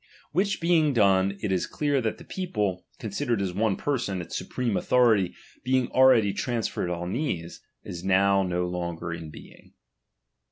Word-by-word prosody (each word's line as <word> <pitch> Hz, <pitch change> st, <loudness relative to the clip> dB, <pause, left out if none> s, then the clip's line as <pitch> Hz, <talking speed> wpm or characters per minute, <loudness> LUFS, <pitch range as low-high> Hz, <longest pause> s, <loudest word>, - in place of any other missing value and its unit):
Which 195 Hz, +5 st, 0 dB
being 165 Hz, -4 st, +3 dB
done, 100 Hz, -3 st, +3 dB
it 105 Hz, -, 0 dB
is 95 Hz, -2 st, 0 dB
clear 145 Hz, -3 st, 0 dB
that 110 Hz, -2 st, -2 dB
the -, -, -12 dB
people, 105 Hz, -, -3 dB
considered 115 Hz, +2 st, -2 dB
as 95 Hz, -2 st, -2 dB
one 105 Hz, +1 st, +1 dB
person, 120 Hz, -10 st, -2 dB
its 85 Hz, -, -6 dB
supreme 120 Hz, -5 st, -2 dB
authority 110 Hz, -7 st, +3 dB, 0.3 s
being 130 Hz, -1 st, +1 dB
already 120 Hz, -6 st, +5 dB
trans 120 Hz, -3 st, -1 dB
ferred 90 Hz, -, -3 dB
on 90 Hz, +2 st, -3 dB
these, 90 Hz, -, -3 dB, 0.2 s
is 85 Hz, 0 st, -7 dB
no 95 Hz, +1 st, +3 dB
longer 90 Hz, -2 st, -2 dB
now 85 Hz, -, -6 dB
in 80 Hz, -2 st, -8 dB
being. -, -, -14 dB
100 Hz, 160 wpm, -26 LUFS, 90-130 Hz, 0.3 s, already